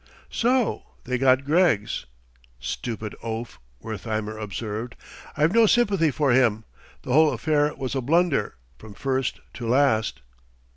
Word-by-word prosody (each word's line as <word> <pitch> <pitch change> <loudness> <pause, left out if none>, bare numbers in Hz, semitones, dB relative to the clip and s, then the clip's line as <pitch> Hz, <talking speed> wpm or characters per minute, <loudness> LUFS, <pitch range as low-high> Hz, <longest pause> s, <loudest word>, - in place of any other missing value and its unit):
"So 245 0 +1 0.2
they 125 0 -2
got 130 +1 +3
Greggs!" 145 - +1 0.5
"Stupid 110 - -5
oaf," 115 +1 -5 0.2
Wertheimer 110 0 -4
observed; 110 +2 -5 0.4
"I've 155 +4 +3
no 230 -1 +6
sympathy 200 -9 +3
for 145 -1 +1
him. 120 -4 +3 0.4
The 125 - -2
whole 155 +1 +5
affair 150 -1 +1
was 130 -1 -4
a 135 - -1
blunder, 165 - +1 0.2
from 105 -2 -12
first 130 0 -2
to 120 - -6
last." 115 - +2
130 Hz, 130 wpm, -24 LUFS, 110-155 Hz, 0.5 s, no